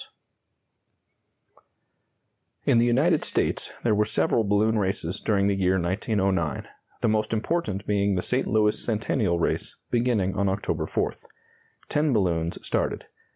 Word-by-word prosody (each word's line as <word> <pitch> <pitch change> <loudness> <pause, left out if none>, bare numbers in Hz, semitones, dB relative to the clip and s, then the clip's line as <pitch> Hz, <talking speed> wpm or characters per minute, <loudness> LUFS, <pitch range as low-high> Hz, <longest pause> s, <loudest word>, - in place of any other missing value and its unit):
] - - -41
In 115 - +4
the 120 - +3
United 150 +7 +3
States - - -1
there 115 - +3
were 105 0 +3
several 110 +1 +1
balloon 105 +2 +2
races 95 -3 -2
during 100 -3 +1
the 100 - +2
year 95 -1 +1
1909, 95 -2 -1 0.3
the - - +2
most 110 0 0
important 110 - -1
being 100 -1 +1
the 90 - -1
St. 125 +1 0
Louis 105 -1 +2
Centennial 110 -4 0
race, 85 - -2 0.2
beginning 115 -6 +1
on 100 -1 +1
October 95 +1 -2
4th. - - -3 0.6
Ten 150 -1 +1
balloons 85 -6 0
started. - - -1
105 Hz, 135 wpm, -25 LUFS, 95-115 Hz, 0.6 s, In